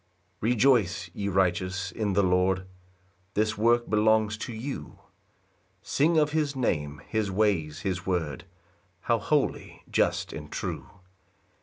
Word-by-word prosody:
1 110 - 0
Rejoice, 105 -8 +2
ye 100 +1 -3
righteous, 95 0 0
in 105 0 -1
the 100 +1 +3
Lord, 90 0 +2 0.7
This 110 +1 +1
work 120 +3 +3
belongs 110 0 +3
to - - -5
you: 120 +5 -6 0.9
Sing 160 +4 +2
of 150 -1 +3
his 150 -3 0
name, 75 - -1
his 110 -2 -1
ways, 95 -7 0
his 90 -2 -2
word, 85 -5 -2 0.6
How 115 -1 +1
holy, 145 +7 -1
just, - - +1
and 75 -1 -8
true! - - -4
100 Hz, 130 wpm, -27 LUFS, 90-115 Hz, 0.9 s, the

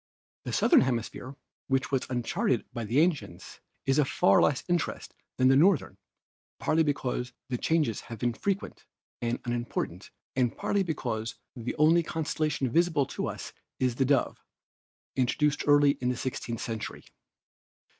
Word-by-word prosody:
"The - - -3
southern - - +5
hemisphere, 130 +1 -2 0.3
which 135 -1 0
was 135 -2 0
uncharted 120 -1 0
by 120 -2 -4
the 120 +7 +2
ancients, 170 -3 -2 0.3
is 135 +2 +2
of 145 - +2
far 95 - +4
less 140 - +2
interest 175 -3 -2 0.2
than 130 - +4
the 135 - +6
northern, 175 +4 +3 0.6
partly 160 +1 +2
because 125 -4 -1 0.2
the 125 - -1
changes 155 -10 +1
have 115 +1 -8
been 120 +2 0
frequent 195 - -3 0.3
and 120 0 -1
unimportant 120 0 -3 0.3
and 125 -2 +1
partly 200 - +1
because 120 - -3 0.2
the 120 -1 -4
only 160 +3 +5
constellation 155 -3 -1
visible 165 -2 +3
to - - -4
us - - -6 0.3
is 125 -2 +1
the 135 +3 +1
Dove, 140 0 +1 0.7
introduced 145 +4 +1
early 145 -1 +6
in 125 - +1
the 125 - -1
sixteenth 120 -3 -4
century. 110 -2 -5
130 Hz, 145 wpm, -28 LUFS, 120-150 Hz, 0.7 s, the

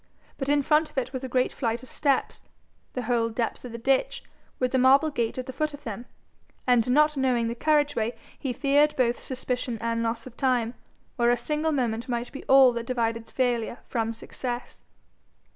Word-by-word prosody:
But 270 0 -2
in 290 0 +3
front 305 +2 +3
of - - -24
it 260 0 -1
was 260 0 -4
a 260 - -4
great 255 +1 +1
flight 235 0 -2
of 255 - -12
steps, 280 -3 0 0.5
the 250 - -3
whole 230 -1 +1
depth 230 +1 -3
of 250 - -7
the 235 - -6
ditch, 270 - 0 0.3
with 255 -1 0
the 260 - +2
marble 275 +5 +5
gate 235 -5 -1
at 255 - -3
the 260 - -7
foot 300 +2 -2
of 285 - -16
them; 235 0 -6 0.6
and 245 -2 +3
not 300 +3 +4
knowing 255 -4 +1
the 230 - -2
carriageway, 290 -4 +1 0.2
he 265 - -2
feared 290 +4 +3
both 245 -2 +1
suspicion 250 -2 -3
and 230 +1 -1
loss 230 0 -2
of 250 -2 -11
time, 245 -3 +1 0.4
where 240 -1 +3
a 245 - +3
single 300 +5 -1
moment 240 -4 -1
might 240 0 -2
be 275 - -8
all 265 -1 +7
that 235 -1 -5
divided 230 -2 -1
failure 240 -2 0
from 225 -2 -1
success. 240 +2 -6
250 Hz, 195 wpm, -26 LUFS, 235-270 Hz, 0.6 s, all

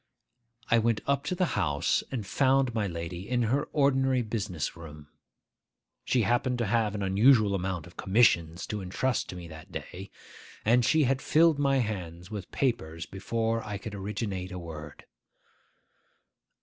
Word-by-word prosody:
I 115 - +6
went 115 -1 +1
up 140 0 0
to 180 - -1
the 180 0 +2
house, - - +1
and 115 -6 -4
found 130 +3 +2
my 110 -3 0
lady 85 +3 -6
in 125 -1 +1
her 130 +6 +1
ordinary 135 -3 +2
business 105 -8 -3
room. 75 -3 -11 1.0
She 125 -3 +2
happened 120 +4 +1
to 120 - 0
have 110 -1 +1
an 100 - -2
unusual 105 +2 +4
amount 95 -3 -2
of 85 - -16
commissions 90 -5 +2
to 105 -1 -4
intrust 115 +7 -1
to - - -6
me 90 -1 -8
that 80 +4 -12
day; 95 +3 -7 0.6
and 120 +3 +4
she 155 +5 +4
had 135 0 +1
filled 160 -1 +4
my 140 -1 +3
hands 90 -6 -4
with 100 -4 -6
papers 80 - -1
before 115 +3 -2
I 105 -1 -4
could 105 +2 -8
originate 100 -2 -4
a 90 - -5
word. 80 -4 -9
105 Hz, 160 wpm, -28 LUFS, 90-125 Hz, 1.0 s, I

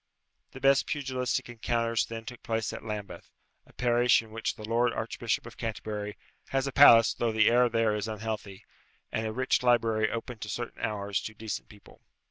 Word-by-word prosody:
The 135 - -9
best 135 0 +4
pugilistic 130 -4 -2
encounters 115 -1 -1
then 115 -1 -7
took 125 +1 -9
place 110 -1 -2
at - - -7
Lambeth, 105 -5 -6 0.4
a - - -20
parish 120 -1 +3
in 110 - -16
which 115 +1 -3
the 110 - -8
Lord 120 +1 +2
Archbishop 115 0 -2
of 120 - -11
Canterbury 105 -2 -4 0.3
has 135 0 0
a 140 - -2
palace 115 -5 +8
though 120 -1 -1
the 110 -1 +3
air 120 0 +4
there 115 -2 +2
is 105 0 -2
unhealthy, 105 -3 -5 0.5
and 110 0 -2
a - - -3
rich 130 +3 +1
library 115 -3 +2
open 115 0 -5
at 105 - -5
certain 120 +2 -5
hours 100 -3 -2
to 110 - -7
decent 110 0 -5
people. 105 -1 -17
115 Hz, 185 wpm, -29 LUFS, 110-120 Hz, 0.5 s, palace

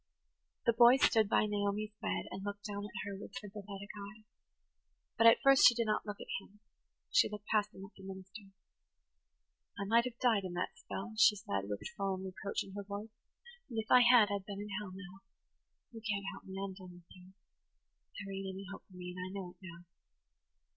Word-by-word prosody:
The 235 - +4
boy 240 +2 +8
stood 220 -5 +4
by 215 - +4
Naomi's 205 0 -1
bed - - -1
and 195 - -6
looked 205 0 -5
down 205 -1 -4
at 190 -1 -6
her 205 -1 -4
with 205 +5 -10
sympathetic 200 -1 -8 0.3
eyes. 220 - -21 0.9
But 230 - +6
at 230 - +8
first 275 0 +8
she 240 - +5
did 230 0 +1
not 215 0 0
look 205 -1 -4
at - - -4
him–she 210 - -2
looked 210 -1 -8
past 210 -1 +1
him 190 - -10
at 195 - -15
the - - -14
minister. 190 +2 -9 1.3
"I 200 - -2
might 230 +4 +4
have 245 -2 -5
died 230 -6 +3
in 185 -2 -5
that 175 +1 -3
spell," 220 +4 -6
she 215 -1 +7
said, 100 - -3
with 105 - -4
sullen 195 -3 -2
reproach 190 +1 -3
in 195 - -12
her 200 0 -5
voice, 205 +2 -7 0.6
"and 230 - -6
if 220 0 -3
I 250 - +9
had 240 -4 +7
I'd 200 -1 -3
been 200 -1 -5
in 210 - -6
hell 210 -2 -6
now. 190 0 -10 0.7
You 225 -2 -9
can't 205 -3 -2
help - - -11
me–I'm 195 0 -5
done 185 -1 -11
with 175 -1 -18
you. 185 +1 -16 0.8
There 195 -1 -6
ain't 195 -1 -4
any 195 +1 -7
hope - - -9
for 185 - -14
me, 180 0 -6
and - - -7
I 185 - -5
know 190 -2 -6
it 180 - -24
now." 170 -2 -11
200 Hz, 205 wpm, -34 LUFS, 190-215 Hz, 1.3 s, I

